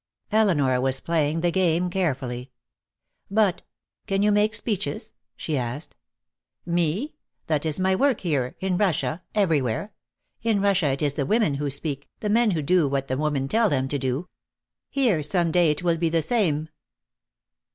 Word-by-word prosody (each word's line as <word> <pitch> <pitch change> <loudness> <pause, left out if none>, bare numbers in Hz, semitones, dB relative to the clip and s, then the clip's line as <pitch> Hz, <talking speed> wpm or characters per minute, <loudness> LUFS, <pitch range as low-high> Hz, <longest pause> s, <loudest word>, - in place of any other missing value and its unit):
Elinor 150 -13 +3
was 135 0 +1
playing 160 -1 0
the 175 0 +2
game 180 -1 +2
carefully. 135 -9 -2 0.8
"But 200 -3 +2 0.5
can 195 -1 +1
you 210 - +4
make 210 +2 +2
speeches?" 195 -12 -3 0.2
she 155 - -2
asked. 125 +5 -5 0.7
"Me? 175 - 0 0.3
That 155 0 0
is 155 +3 -1
my 190 0 +2
work, 275 +2 +2
here, 140 -8 -1
in 185 -1 -1
Russia, 180 -3 0
everywhere. 165 - 0 0.5
In 225 -3 +1
Russia 195 -5 +2
it 135 +1 -1
is 145 -2 +2
the 145 -2 -2
women 215 -7 +2
who 145 +1 -2
speak, 140 0 -2
the 210 - -2
men 230 +2 +4
who 165 -6 -1
do 170 +1 +3
what 135 0 -2
the 130 - 0
women 145 -2 -1
tell 225 +6 +2
them 135 -4 0
to 145 - -1
do. 135 +6 -2 0.6
Here 245 - +2
some 165 +3 0
day 175 -1 +4
it 150 +3 -1
will 170 -2 +2
be 165 0 +1
the 165 -1 +1
same." 160 -7 0
165 Hz, 165 wpm, -24 LUFS, 145-195 Hz, 0.8 s, you